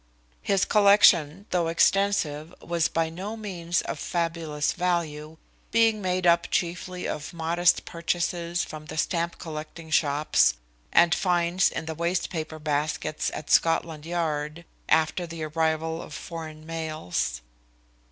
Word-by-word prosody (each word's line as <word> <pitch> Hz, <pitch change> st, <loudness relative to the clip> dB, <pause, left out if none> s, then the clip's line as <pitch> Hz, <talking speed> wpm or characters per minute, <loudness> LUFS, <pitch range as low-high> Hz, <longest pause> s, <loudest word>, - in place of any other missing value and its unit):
His 195 Hz, -1 st, +2 dB
collection, 200 Hz, -4 st, +5 dB
though 175 Hz, -2 st, +1 dB
extensive, 165 Hz, -3 st, +1 dB
was 170 Hz, -1 st, 0 dB
by 165 Hz, -1 st, 0 dB
no 195 Hz, +6 st, -6 dB
means 180 Hz, -5 st, -2 dB
of -, -, -5 dB
fabulous 165 Hz, -3 st, -1 dB
value, 160 Hz, -3 st, -2 dB, 0.3 s
being 225 Hz, -2 st, +3 dB
made 185 Hz, -1 st, -1 dB
up 170 Hz, 0 st, +4 dB
chiefly 180 Hz, +1 st, -2 dB
of 150 Hz, +2 st, -5 dB
modest 170 Hz, +1 st, +2 dB
purchases 170 Hz, 0 st, -1 dB
from 155 Hz, 0 st, -8 dB
the 155 Hz, -, -7 dB
stamp 170 Hz, +1 st, -1 dB
collecting 160 Hz, 0 st, -8 dB
shops, 145 Hz, -, +3 dB, 0.4 s
and 170 Hz, -1 st, +5 dB
finds 180 Hz, 0 st, +2 dB
in 160 Hz, -, -5 dB
the 160 Hz, -, -4 dB
waste 170 Hz, +3 st, -1 dB
paper 160 Hz, -2 st, -4 dB
baskets 150 Hz, 0 st, -1 dB
at 150 Hz, -, -6 dB
Scotland 165 Hz, -2 st, +2 dB
Yard 160 Hz, -1 st, -2 dB, 0.2 s
after 160 Hz, +3 st, +2 dB
the 165 Hz, -1 st, -6 dB
arrival 160 Hz, +1 st, -1 dB
of -, -, -10 dB
the -, -, -5 dB
foreign 155 Hz, -2 st, -8 dB
mails. 155 Hz, -, -3 dB
165 Hz, 135 wpm, -26 LUFS, 155-175 Hz, 0.4 s, collection